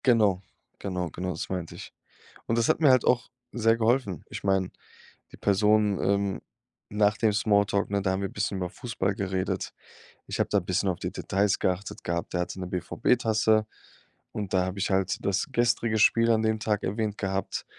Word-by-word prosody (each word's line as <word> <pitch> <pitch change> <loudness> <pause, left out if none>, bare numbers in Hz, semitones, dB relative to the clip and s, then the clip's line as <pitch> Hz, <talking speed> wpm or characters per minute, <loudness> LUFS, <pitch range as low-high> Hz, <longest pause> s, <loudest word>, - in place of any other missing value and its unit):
Genau, 105 -7 +4 0.4
genau, 90 -3 -3
genau, 90 +1 -4
das - - -5
meinte 90 -3 -4
ich. - - -10 0.5
Und 115 - 0
das 115 - +2
hat - - +3
mir 150 - +6
halt 130 -1 +5
auch 125 0 +2 0.2
sehr 115 -1 +2
geholfen. 115 - +1
Ich - - -7
meine, 95 -2 +1 0.6
die - - -12
Person, 105 0 +2
ähm 100 0 0 0.5
Nach 105 0 +3
dem 110 -2 +2
Smalltalk, 100 -1 +2
ne, 100 -1 +1
da 95 - +1
haben 95 +1 -1
wir 100 - -1
'n - - -16
bisschen 100 - -2
über 90 -1 -2
Fußball 105 -2 -2
geredet. 95 -3 -2 0.5
Ich - - -4
habe - - -1
da 100 - +3
bisschen 95 +1 -1
auf 90 - -2
die - - -3
Details 100 0 0
geachtet 95 +2 -2
gehabt. 85 0 -3
Der 90 - 0
hatte 90 - -5
'ne 90 - -4
BVB-Tasse 110 +4 +1 0.7
und 105 -3 -4
da 90 -1 +3
habe 95 +1 -5
ich 95 - 0
halt 95 -1 0
das 100 0 0
gestrige 115 -2 +1
Spiel 115 +2 +4
an 110 -1 +3
dem 110 0 +1
Tag 105 -1 -1
erwähnt 105 +1 -2
gehabt. 95 -1 -3
100 Hz, 190 wpm, -27 LUFS, 95-110 Hz, 0.7 s, mir